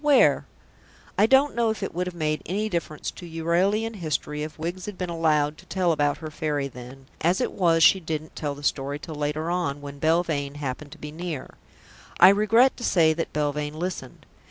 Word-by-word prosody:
Where?" 290 -2 +4 0.7
I 215 - +4
don't 270 +4 +4
know 235 -1 +1
if 220 -2 -3
it - - -3
would 180 +2 -2
have 180 - -6
made 155 -2 -1
any 210 +5 -1
difference 165 -5 -3
to 175 - -10
Euralian 185 +7 0
history 150 -3 -2
if 155 +1 -6
Wiggs 175 +4 -4
had 205 -3 -6
been 180 -2 -3
allowed 155 -2 +1
to - - -16
tell 185 -2 +1
about 145 -2 +1
her 155 -1 -7
Fairy 145 -2 -2
then; 130 +1 -11 0.2
as 175 +3 +2
it - - 0
was, 165 -3 +3
she 190 - +7
didn't 155 -2 -5
tell 145 -2 -3
the 145 - -12
story 140 0 -1
till 160 +1 -8
later 150 +2 -2
on, 170 -6 -1
when 140 0 -9
Belvane 155 -3 +1
happened 145 0 -5
to - - -13
be 150 -1 -8
near. 160 -4 -5 0.7
I 185 - +10
regret 225 +6 +4
to 240 - -8
say 160 -7 +4
that 165 +1 -3
Belvane 150 0 -2
listened. 170 -7 -5
160 Hz, 205 wpm, -25 LUFS, 150-180 Hz, 0.7 s, I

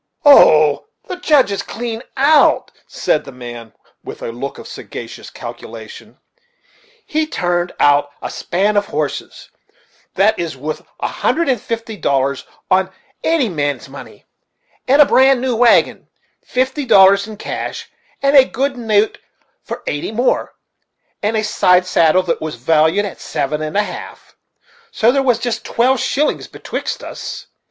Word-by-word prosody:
"Oh! 155 - +6 0.2
the 370 - -5
Judge 295 - +3
is 200 - -2
clean 230 -1 -5 0.2
out," 290 +3 +4 0.2
said 150 - -1
the - - -10
man 120 -3 -9 0.3
with - - -9
a - - -4
look 130 +4 -6
of - - -10
sagacious - - -9
calculation; 465 - -10 0.9
"he 310 0 -1
turned 175 - -1
out 145 0 +3
a - - -6
span 205 +4 -1
of 205 0 +1
horses, 150 -1 -5 0.6
that 200 +3 +2
is 165 -5 -4
wuth 155 +4 -5 0.2
a - - 0
hundred 335 +1 -1
and 250 -5 0
fifty 230 -1 -5
dollars 140 -4 -1 0.2
of 190 0 +3 0.3
any 320 -6 +2
man's 145 -6 -3
money, - - -12 0.6
with 280 +3 +5
a - - +8
bran 265 -1 +4
new 255 -1 -1
wagon; 235 +1 +3 0.4
fifty 260 +3 -1
dollars 200 -3 +5
in 215 -1 -9
cash, - - -5 0.4
and 275 +1 +3
a 270 - +9
good 270 +1 -2
note 220 -2 +1 0.4
for - - -7
eighty 145 +7 -3
more; 240 +4 0 0.7
and 215 +2 0
a 215 - 0
side 180 -4 +3
saddle 175 0 +3
that 170 -2 -2
was 155 -3 -4
valued 160 - +2
at 195 - -8
seven 150 +2 -3
and 155 +5 -3
a 210 - +3
half - - -9 0.5
so 240 - +2
there 275 +1 +1
was 250 -4 +2
jist 240 -1 -3
twelve 255 +2 +1
shillings 300 +2 -1
betwixt - - -5
us. - - -7
205 Hz, 150 wpm, -17 LUFS, 155-255 Hz, 0.9 s, a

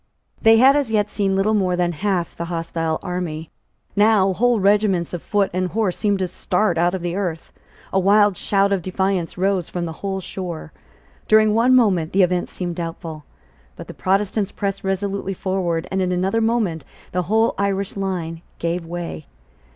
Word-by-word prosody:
They 225 -1 +6
had 265 +4 +6
as 285 -5 +1
yet 210 -1 +1
seen 195 -2 0
little 200 +3 +2
more 185 -4 +1
than 175 -1 +1
half 180 0 -2
the 170 - -4
hostile 165 -1 -2
army. 175 -4 -4 0.4
Now 205 -2 +4
whole 240 +3 +2
regiments 195 -3 +2
of 175 - -4
foot 205 -2 0
and 185 0 0
horse 195 -1 -1
seemed 205 -2 +1
to 190 -1 -1
start 180 -1 0
out 175 +2 +2
of 180 - -5
the 175 0 -2
earth. 175 -5 -4 0.4
A 190 - +3
wild 205 +1 +4
shout 200 +2 +1
of 195 -2 +1
defiance 185 -1 -1
rose 190 -2 0
from 175 -1 -3
the 165 - -4
whole 195 -1 -2
shore: 175 - -6 0.5
during 215 0 +5
one 240 +4 +4
moment 190 -10 +2
the 195 0 +5
event 180 0 0
seemed 175 -2 -5
doubtful: 165 -2 -6 0.5
but - - -10
the - - -8
Protestants 195 +1 0
pressed 200 -1 -3
resolutely 195 0 -2
forward; 180 -3 -1
and 190 0 0
in 185 -1 0
another 190 +5 +1
moment 220 -8 0 0.3
the 180 - 0
whole 225 +1 +3
Irish 200 -1 -1
line 175 -4 -3 0.2
gave 170 +1 -2
way. 170 - -6
190 Hz, 180 wpm, -21 LUFS, 175-205 Hz, 0.5 s, They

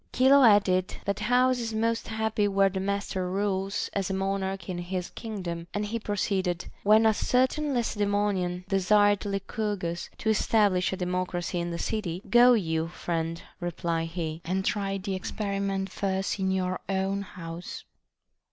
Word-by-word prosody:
Chilo 270 +2 +6
added, 200 -5 +4
That 200 -1 -1
house 250 +1 +3
is 225 -2 -3
most 230 +1 0
happy 220 -1 0
where 195 -1 +3
the 190 0 -3
master 195 -1 -2
rules 195 0 -1
as 195 -2 -1
a 190 - -1
monarch 195 -1 -2
in 180 -2 -3
his 180 0 -4
kingdom. 180 -7 -5
And 205 0 0
he 230 +3 -3
proceeded, 190 -4 -1 0.2
When 215 +2 +5
a 220 - +5
certain 260 +6 +1
Lacedaemonian 205 -5 0
desired 205 +1 +3
Lycurgus 195 -3 -3
to 220 - +1
establish 205 -4 +2
a 190 - -3
democracy 180 -1 -2
in 170 0 -2
the 170 - -3
city, 185 -2 -3
Go 245 +1 +7
you, 160 -7 0
friend, 165 -1 -3 0.2
replied 170 -2 -2
he, 165 -1 -4
and 190 +3 -1
try 195 -1 0
the 195 0 -4
experiment 195 0 -2
first 195 0 -1
in 190 0 +1
your 185 -1 0
own 195 +1 0
house. 170 -3 -8
195 Hz, 150 wpm, -27 LUFS, 180-210 Hz, 0.2 s, Go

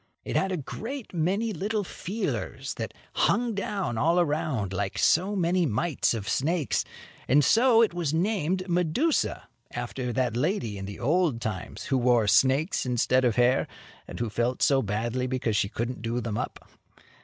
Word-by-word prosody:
It - - -4
had 190 - +1
a 185 - -1
great 230 - -6
many 195 +7 0
little 205 +4 -1
feelers 195 +4 -4
that - - -4 0.2
hung 240 -1 +2
down 195 - -2
all 165 +6 +3
around 145 - 0
like 95 - -2
so 190 +5 +3
many 175 -1 +2
mites 135 +2 0
of 105 -3 -5
snakes, 155 +4 0 0.4
and 140 +2 +4
so 230 - +5
it 220 - +1
was 170 -5 -1
named 185 +1 0
Medusa, 180 - 0 0.2
after 120 +1 -4
that 125 -2 0
lady 125 - -1
in 95 - -5
the 100 +1 -8
old 150 -1 +1
times 105 -6 -5
who 135 - 0
wore 120 -3 +3
snakes 135 - +3
instead 125 +1 +2
of 120 -3 +2
hair, 125 +2 +3 0.4
and - - -8
who 115 -2 -2
felt 120 +3 0
so 135 -1 +4
badly 115 +4 -2
because 125 -4 -1
she 100 -1 +1
couldn't 120 +3 -4
do 115 +1 -2
them 115 -3 -3
up. - - -6
140 Hz, 165 wpm, -27 LUFS, 120-185 Hz, 0.4 s, so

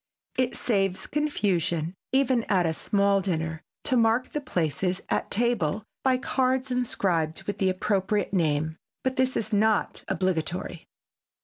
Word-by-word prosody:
It 255 -1 0
saves 195 -5 0
confusion 180 - 0 0.2
even 260 -3 +3
at 185 -3 +2
a 160 - +1
small 200 +3 +2
dinner 160 -4 -2 0.2
to 265 - +1
mark 230 +1 +3
the 295 - -3
places 180 - -1
at - - 0
table 215 -4 +1 0.2
by 260 -1 +3
cards 260 0 0
inscribed 180 -10 0
with 205 -1 -4
the 190 - +3
appropriate 195 +1 0
name, 160 -2 +1 0.3
but 260 0 0
this 260 -1 +1
is 220 0 -2
not 215 +1 +2
obligatory. 175 -2 -2
200 Hz, 135 wpm, -27 LUFS, 175-250 Hz, 0.3 s, even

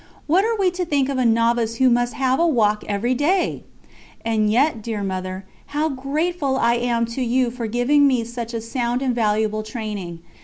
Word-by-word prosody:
What 355 +6 +3
are 455 +1 0
we 380 -3 +2
to 360 +1 -3
think 285 -5 0
of 270 -2 -1
a 255 - +2
novice 230 0 +2
who 260 +2 +3
must 245 0 +2
have 260 -1 +1
a 340 - +4
walk 215 -8 +2
every 210 +5 0
day?" 340 +9 0 0.6
And 215 -2 +1
yet, 250 0 +2
dear 215 -2 -4
Mother, 185 0 -4 0.3
how 310 +1 +1
grateful 280 +1 -1
I 235 -2 +3
am 235 -1 0
to 260 - -3
you 250 0 +1
for 235 -2 -4
giving 255 +6 +3
me 255 -4 +1
such 235 0 -6
a 225 - -2
sound 240 +2 -2
and 255 -2 +1
valuable 215 -1 0
training. 210 -7 -6
240 Hz, 195 wpm, -21 LUFS, 220-275 Hz, 0.6 s, a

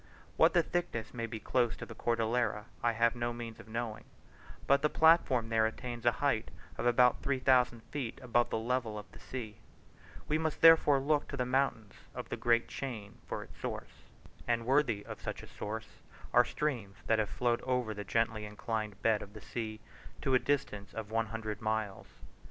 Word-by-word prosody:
What - - +5
the 170 - +5
thickness 170 -12 -3
may 115 -1 -3
be 110 -1 -5
close 120 0 +1
to - - -6
the - - -9
Cordillera, 115 -2 0 0.2
I 120 -1 +2
have 115 +2 +2
no 120 0 -1
means 115 -1 -7
of 115 - -12
knowing, 115 -1 -4 0.6
but 140 0 +4
the 150 - +3
platform 155 -9 +4
there 110 -1 +3
attains 120 +1 -5
a - - +7
height 115 -5 +1 0.3
of 120 - -1
about 125 +1 +4
three 140 -1 0
thousand 125 -3 +3
feet 135 -6 -3
above 120 -2 +1
the - - -1
level 115 -1 -1
of 105 - -7
the - - -14
sea; 115 -4 -6 0.7
we 155 +1 +1
must 160 -1 -2
therefore 160 -4 +7
look 145 +2 +1
to 140 - -5
the 125 - 0
mountains 125 -5 0 0.2
of - - -6
that - - -4
great 115 -1 +3
chain 115 -7 -6
for - - -4
its - - -16
source; - - -6 0.5
and 115 -1 +1
worthy 125 -6 +2
of - - -8
such - - -5
a - - -10
source 110 +1 -6 0.3
are - - +7
streams 120 -10 -2
that 110 -1 +3
have 105 -2 0
flowed 120 -1 0
over 125 -4 0
the 105 0 -5
gently 115 0 0
inclined 105 0 -4
bed 110 -2 +3
of 100 - -10
the 110 - -10
sea 110 -2 -5 0.4
to 135 - +1
a 130 - +6
distance 135 -9 -2
of 110 -1 -5
one 115 0 +1
hundred 110 -1 -5
miles. 110 -2 -2
115 Hz, 195 wpm, -32 LUFS, 110-130 Hz, 0.7 s, a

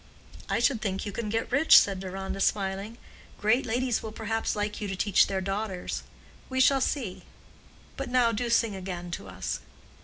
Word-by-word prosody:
"I - - +1
should 235 0 +2
think 195 -2 -2
you 205 - -3
can 215 +1 -4
get 225 +3 -2
rich," 285 +5 +7
said 195 -2 +4
Deronda, 190 +1 -5
smiling. 200 +3 -1 0.4
"Great 235 +5 +2
ladies 245 +1 0
will 220 - -6
perhaps 225 +1 -2
like 210 0 -3
you 205 - -2
to 195 - -3
teach 195 +1 +4
their 190 -1 -1
daughters. 195 -1 -3 0.5
We 260 0 -1
shall 270 +1 +5
see. 240 -9 -2 0.8
But - - -4
now 245 -2 +3
do 235 +2 -2
sing 230 -3 +2
again 180 -2 -6
to 100 - -5
us." 95 0 -4
210 Hz, 180 wpm, -28 LUFS, 195-235 Hz, 0.8 s, rich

